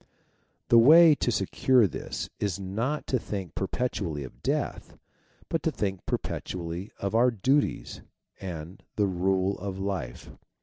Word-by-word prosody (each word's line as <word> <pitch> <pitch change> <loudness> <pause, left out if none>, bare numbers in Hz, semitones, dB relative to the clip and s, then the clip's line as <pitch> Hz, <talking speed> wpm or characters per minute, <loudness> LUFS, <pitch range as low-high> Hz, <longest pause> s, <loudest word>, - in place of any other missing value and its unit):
The 120 - +8
way 160 +6 +8
to 125 - 0
secure 120 +4 +3
this 95 - -4
is 100 -3 -1
not 115 +10 -2
to 130 - 0
think 95 -6 -5
perpetually 95 - -2
of 65 - -12
death, - - -2 0.5
but - - -1
to - - 0
think 95 -3 -3
perpetually 85 +2 -4
of 100 +1 -3
our 120 +3 +5
duties, 130 +6 0 0.4
and 90 -1 -7
of - - -35
the 105 - +2
rule 95 +1 0
of 95 0 -5
life. 95 -11 -4
100 Hz, 140 wpm, -27 LUFS, 90-120 Hz, 0.5 s, The